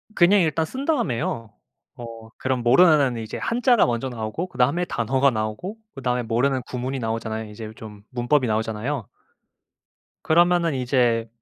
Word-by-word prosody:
그냥 190 +3 +5
일단 160 -1 +1
쓴 265 - -6
다음에요. 115 - -1 0.4
어 115 -1 -9
그럼 130 -2 -1
모르는 140 -1 +5 0.2
한자가 240 0 +3
먼저 120 +2 -2
나오고 115 +9 -4
그다음에 145 +3 +1
단어가 130 +1 +1
나오고 110 - -4 0.2
그다음에 125 -2 -1
모르는 125 +4 +1
구문이 130 +2 -4
나오잖아요. 110 -1 -3
이제 110 0 -8
좀 105 -2 -11
문법이 125 +2 +1
나오잖아요. 110 +3 -2 1.2
그러면은 170 -1 +3
이제 120 -3 +1
125 Hz, 340 characters per minute, -23 LUFS, 115-155 Hz, 1.2 s, 그냥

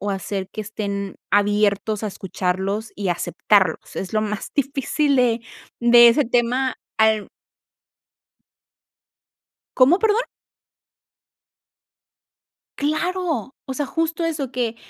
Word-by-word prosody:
o 205 +1 -2
hacer 195 0 -4
que 215 - -4
estén 200 -2 -5
abiertos 205 +1 +1
a 215 - -1
escucharlos 190 +2 -3
y 200 -2 -2
aceptarlos. 180 +1 +1
Es 190 +2 -5
lo 215 - +2
más 210 -1 -4
difícil 280 +1 0
de 240 -2 +2 0.4
de 240 0 +8
ese 275 +4 +3
tema 245 +2 0 0.2
al 220 -1 +3 2.5
¿Cómo, 275 +8 +5
perdón? 445 +3 +1 2.5
Claro, 310 - -1 0.2
o 265 - -4
sea, 290 +2 -2
justo 330 +3 -2
eso 300 -6 -3
que 235 -2 -2
230 Hz, 105 wpm, -22 LUFS, 205-275 Hz, 2.5 s, de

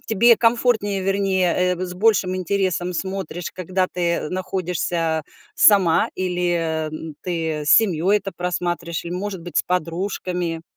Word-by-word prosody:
тебе 230 +2 +5
комфортнее, 230 -4 +1
вернее, 190 -2 +1 0.2
э, 185 +1 -4
с 180 - -7
большим 190 -2 +2
интересом 185 -1 -1
смотришь, 190 -2 -4
когда 185 +1 -1
ты 170 -4 -1
находишься 175 -3 -2 0.3
сама, 190 -6 +5
или 175 -4 -1 0.3
ты 160 -4 -2
с - - 0
семьей 195 -2 +4
это 195 0 -7
просматриваешь, 175 -2 -3
или, 170 - -5
может 190 0 -4
быть, 175 0 -3
с - - +2
подружками? 180 -1 -2
180 Hz, 130 wpm, -21 LUFS, 170-195 Hz, 0.3 s, тебе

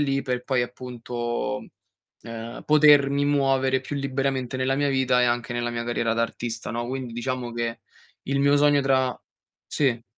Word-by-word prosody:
lì 135 -1 +1
per 125 -1 -3
poi 130 -3 +1
appunto, 120 -1 -4 0.6
ehm, 115 +1 -7
potermi 145 -2 +5
muovere 135 -2 +2
più 140 +2 -5
liberamente 135 -2 -2
nella 130 +1 +1
mia 145 0 +1
vita 130 -2 +2
e - - +5
anche 120 0 -1
nella 120 0 -2
mia 115 0 -3
carriera 120 -1 0
da 115 - +1
artista, 115 0 -4
no. 120 0 -3
Quindi 130 -1 -5
diciamo 120 0 -3
che 115 -1 -3 0.5
il 140 0 +1
mio 140 +1 +4
sogno 145 0 +4
tra 130 -2 +2 0.5
sì. 120 -5 0
130 Hz, 165 wpm, -25 LUFS, 120-135 Hz, 0.6 s, potermi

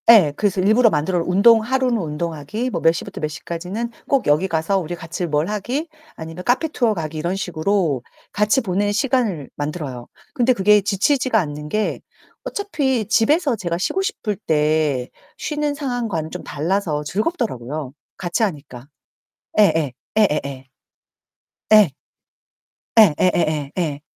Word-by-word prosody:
예. 195 -11 +8
그래서 200 0 0
일부러 220 +5 +5
만들어 170 +2 0
운동 220 +5 +5
하루는 255 +1 +1
운동하기 165 - -3
뭐 - - -3
몇 165 - +5
시부터 165 - -6
몇 155 - 0
시까지는 180 +9 -5 0.2
꼭 275 -3 +2
여기 150 +6 +3
가서 165 +3 0
우리 175 -1 -4
같이 165 +1 -5
뭘 150 +1 0
하기 240 - -2 0.3
아니면 165 +2 -8
카페 255 - +2
투어 240 -7 +1
가기 160 -4 -5
이런 170 +4 -1
식으로 175 -5 0 0.3
같이 210 +6 +2
보내는 205 0 0
시간을 220 - 0
만들어요. 145 -5 -5 0.3
근데 250 +1 +3
그게 210 -1 +4
지치지가 220 +5 +2
않는 150 -3 -4
게 215 +5 -1 0.4
어차피 290 - -1
집에서 265 - +2
제가 170 -5 -3
쉬고 280 - -1
싶을 385 - -2
때 150 - 0 0.3
쉬는 295 -1 -2
상황과는 235 - -3
좀 - - -6
달라서 160 -1 -1
즐겁더라고요, 155 - -3 0.2
같이 175 +5 -2
하니까. 140 - -4 0.7
예예. 160 -8 +4 0.3
예예예. 140 -9 0 1.1
예. 210 -7 +7 1.1
예 - - +11 0.2
예예예 155 -5 +1
예. 150 -4 -2
185 Hz, 305 characters per minute, -21 LUFS, 155-230 Hz, 1.1 s, 예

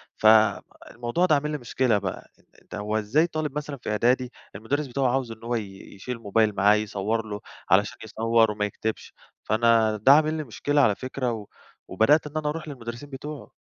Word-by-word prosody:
فالموضوع 110 - +2
ده 155 - +4
عامِل 150 +1 -1
لي 150 - -2
مشكلة 125 -3 +1
بقى، 100 -2 -6 0.3
أنتَ - - -10
هو 105 +1 -2
إزاي 120 +11 +2
طالِب 155 -4 -4
مثلًا 145 -1 -5
في 120 - -7
إعدادي، 125 +4 +1 0.2
المدرِّس 135 +9 -2
بتاعه 135 +1 0
عايِز 130 -3 -2
إن 115 0 -11
هو 120 +1 -2
ي 100 -4 -5 0.2
يشيل 120 +5 -6
موبايل 110 -1 +1
معاه 100 +2 +5
يصوِّر 105 +1 -2
له، 105 -1 -5 0.3
علشان 100 +3 +3
يصوِّر 115 0 +2
وما 105 0 -1
يكتِبش؟ 110 +2 -5 0.3
فأنا 110 0 +3
ده 110 +6 +5
عامِل 155 +1 +3
لي 155 -1 -3
مشكلة 145 +3 0
على 105 -7 +3
فكرة، 130 0 -3
و 110 -3 -6 0.4
وبدأت 150 +7 +3
إن 150 +1 -6
أنا 150 -1 -1
أرُوح 155 +1 -5
للمدرِّسين 120 -1 -8
بتوعه. 145 +1 -8
115 Hz, 185 wpm, -25 LUFS, 110-145 Hz, 0.4 s, معاه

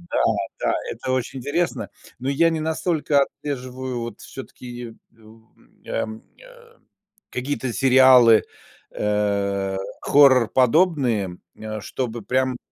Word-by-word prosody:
Да, 175 - -1 0.4
да, - - 0 0.2
это 130 - -4
очень 130 +1 -2
интересно, 155 +7 -2 0.3
но 130 +2 -2
я 165 +4 +3
не 165 -1 -2
настолько 155 -2 0
отслеживаю 130 -3 -4
вот 115 -2 -7
все-таки, 120 -3 -9 0.2
у, 110 0 -19
м, - - -28
ам, 110 0 -4 0.2
э, 485 -2 -18 0.5
какие-то 130 -1 -3
сериалы, 130 -4 +6 0.5
э, 100 -2 -1 0.2
хоррор-подобные, 130 - +3 0.2
э, 110 0 -6
чтобы 120 -1 -4
прям, 130 +1 0
130 Hz, 110 wpm, -22 LUFS, 115-145 Hz, 0.5 s, сериалы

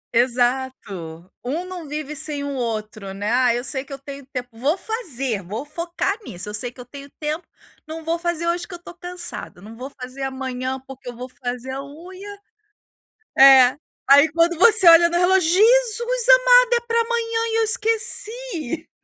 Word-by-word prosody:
Exato, 240 -9 -1 0.2
um 310 +9 -3
não 360 -4 -8
vive 300 0 -5
sem 290 0 -1
o 285 0 -4
outro, 215 -5 -5
né: 205 +3 -3
"Ah, 245 -1 +3
eu 245 - -3
sei 265 -1 -2
que 280 - -19
eu 275 - -5
tenho 275 0 -10
tempo, 250 -1 -5
vou 285 +10 0
fazer, 275 - -3
vou 215 +10 -6
focar 340 +5 -3
nisso, 185 - -7
eu - - -7
sei 240 +3 -3
que 250 - -21
eu 245 - -9
tenho 280 +2 -12
tempo, 310 +3 -3 0.4
não 320 +1 -7
vou 335 +1 -1
fazer 340 -1 -2
hoje 345 +1 -1
que 365 - -9
eu - - -8
estou 350 - -12
cansada, 355 - -8
não 215 +4 -12
vou 255 +4 -8
fazer 255 +2 -9
amanhã 260 -1 -4
porque 265 -2 -10
eu 245 - -9
vou 250 +2 -7
fazer 250 0 -6
a 270 +1 -5
unha." 370 +8 -11 1.0
É, 265 -1 +8 0.3
aí 285 +3 +7
quando 335 +1 +2
você 435 -3 +5
olha 335 +1 +7
no 345 - 0
relógio: 360 -2 +3
"Jesus 475 +4 +3
amado, - - +6
é 475 - +3
para 465 0 0
amanhã 460 -1 -1
e 455 - +1
eu - - +3
esqueci." 440 - -1
295 Hz, 185 wpm, -21 LUFS, 250-365 Hz, 1.0 s, É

